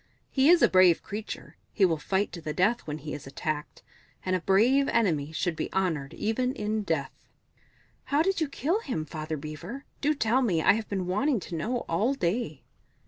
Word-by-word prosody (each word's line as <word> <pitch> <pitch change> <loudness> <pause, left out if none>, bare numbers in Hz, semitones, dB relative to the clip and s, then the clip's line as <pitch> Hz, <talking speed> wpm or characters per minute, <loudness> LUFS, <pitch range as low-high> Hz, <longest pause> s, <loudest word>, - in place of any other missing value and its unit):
He 270 +2 +4
is 350 0 +6
a - - +8
brave 185 -2 +5
creature; 210 +1 -7
he 200 - +3
will 165 -4 +1
fight 190 +6 0
to 170 -1 -7
the 155 -1 -4
death 210 +6 +1
when 150 0 -3
he 150 0 -7
is 140 - -7
attacked 150 +2 -4 0.4
and 185 0 +1
a 185 - -1
brave 245 +10 +4
enemy 160 -10 +1
should 165 +1 -1
be - - -4
honoured, 165 -8 -1
even 250 +4 0
in 215 -1 -1
death." 160 -8 -1 0.9
"How 290 +2 +2
did 385 -1 0
you 315 - +2
kill 320 - 0
him, 160 - -3
Father 155 0 -5
Beaver? 155 - -7 0.2
Do 300 +1 +2
tell 245 0 +2
me 190 -10 +2
I - - +5
have 220 0 -3
been 190 -3 -2
wanting 235 +8 +1
to 175 - -6
know 225 +10 -1
all 215 +11 +1
day." 175 - -2
190 Hz, 195 wpm, -28 LUFS, 160-245 Hz, 0.9 s, a